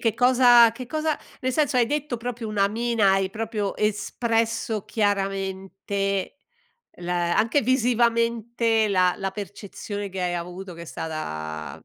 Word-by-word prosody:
che 225 -2 +2
cosa 245 -1 +6
che 250 +2 -7
cosa 310 +3 -1 0.2
nel 260 - 0
senso 290 -2 +1
hai 235 - +4
detto 295 -1 -2
proprio 235 0 -5
una 200 -2 +2
mina, 225 -2 +2
hai 195 -1 +1
proprio 215 -2 -3
espresso 225 +1 -1
chiaramente 195 -1 -2 0.6
l 175 - -8
anche 180 +9 +2
visivamente 235 -2 +2
la 185 -2 +3
la 195 0 -3
percezione 205 0 -6
che 190 -1 -6
hai 175 -1 -1
avuto 180 +2 -6
che 170 - -9
è - - -7
stata,, 80 - -6
210 Hz, 135 wpm, -24 LUFS, 190-235 Hz, 0.6 s, cosa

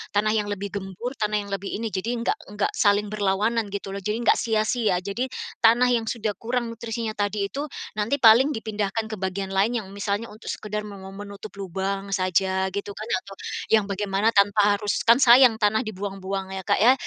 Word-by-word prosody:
tanah 210 +1 +3
yang 215 -1 0
lebih 200 -1 -4
gembur, 195 +4 -5
tanah 210 -1 0
yang 200 - -11
lebih 195 0 -3
ini, 225 +1 -3
jadi 220 +6 -2
enggak 235 0 -1
enggak 205 0 -1
saling 205 0 +3
berlawanan 210 +2 0
gitu 200 -1 -4
loh. - - -3
Jadi 210 +3 -1
enggak - - +4
sia-sia, 220 -2 +1
jadi 200 +7 -2 0.4
tanah 240 +2 +5
yang 235 -2 +1
sudah 220 -2 -2
kurang 240 0 -2
nutrisinya 230 -1 -4
tadi 205 -1 -1
itu, 280 +8 -4 0.3
nanti 215 +7 +1
paling 235 +5 +7
dipindahkan 215 -2 -2
ke 220 - -4
bagian 190 +1 -3
lain 215 +5 +1
yang 195 - -12
misalnya 200 +2 -2
untuk 215 +2 -13
sekedar 210 0 -4
me 205 -1 -9
me 190 0 -9 0.2
menutup 200 +1 -9
lubang 195 +1 -3
saja 190 0 +1
gitu 200 +1 -5
kan, 215 +2 -7 0.2
atau 195 - -10 0.4
yang 215 -2 +5
bagaimana 200 +1 +1
tanpa 205 0 +4
harus 205 -1 -1
kan 230 +1 +8
sayang 250 -2 +7
tanah 220 +1 +2
dibuang-buang 195 -1 -4
ya, 190 - -4
Kak, - - +2
ya. 245 +4 +7
210 Hz, 195 wpm, -24 LUFS, 195-225 Hz, 0.4 s, kan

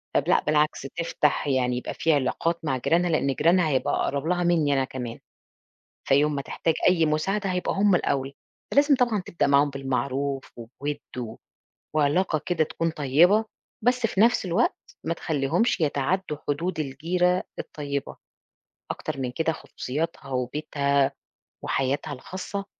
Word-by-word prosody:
طَب - - +2
لأ، - - +3
بالعكس 150 0 +1
تفتَح، 150 +1 -1
يعني 125 -2 +1
يبقى 125 - -4
في 160 - +2
علاقات 165 +4 0
مع 130 -3 0
جيرانها، 175 +7 +2
لإن 145 -4 +1
جيرانها 170 +3 +3
هيبقى 130 -3 +1
أقرَب 140 +1 -1
لها 180 0 +1
منّي 165 -5 +3
أنا 135 -1 +2
كمان. 125 -3 -6 0.9
فيوم 145 +2 +3
ما 140 - -1
تحتاج 160 +4 -1
أي 170 -3 +4
مساعدة 195 +7 0
هيبقى 180 0 -1
هُم 200 -1 +4
الأول، 135 -5 0 0.4
فلازم 285 0 +5
طبعًا 240 -6 +1
تبدأ 170 - 0
معاهم 140 +1 +4
بالمعروف 135 0 -2
وبوِد 140 +5 -5 0.2
و 115 -3 -5 0.6
وعلاقة 155 +3 +2
كده 175 -3 +2
تكُون 165 +2 -2
طيبة، 165 +9 +4 0.4
بس 245 0 +2
في 210 -3 0
نَفْس 235 -2 +4
الوقت 185 +7 -1
ما 165 - 0
تخلّيهمش 165 - 0
يتعدّوا 150 +3 0
حدود 160 +5 -1
الجيرة 175 +6 0 0.2
الطيبة. 140 -2 -4 0.8
أكتر 155 -3 -5
من 125 -2 -2
كده 160 +5 0
خصوصياتها 150 -1 -5
وبيتها 140 +2 -1 0.6
وحياتها 135 +2 -1
الخاصة، 185 +8 -6
150 Hz, 140 wpm, -25 LUFS, 140-180 Hz, 0.9 s, فلازم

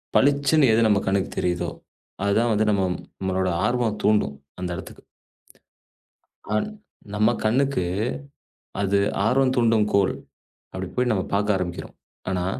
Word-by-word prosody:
பளிச்சுன்னு 140 -1 +4
எது 115 0 +4
நம்ம 100 -2 +3
கண்ணுக்குத் 95 0 -1
தெரியுதோ 90 -1 -1 0.5
அது 100 - +2
தான் 110 -2 +2
நம்மளோட 95 0 -2 0.2
ஆர்வம் 120 -4 0
தூண்டும். 85 -10 +2 0.2
அந்த 90 -1 -3
இடத்துக்கு. - - -10 1.5
அன். 105 - 0 0.4
நம்ம 105 +2 +3
கண்ணுக்கு 130 0 +1 1.0
அது 100 0 +2 0.3
ஆர்வம் 130 +2 +3
தூண்டும் 115 -3 +3
கோல். 100 -1 +3 0.6
அப்படி 95 0 -5
போய்ப் 120 -7 0
பாக்க 100 +1 +1
ஆரம்பிக்கிறோம். 90 -2 -5 0.3
ஆனா 90 -1 -1
105 Hz, 115 wpm, -24 LUFS, 95-120 Hz, 1.5 s, பளிச்சுன்னு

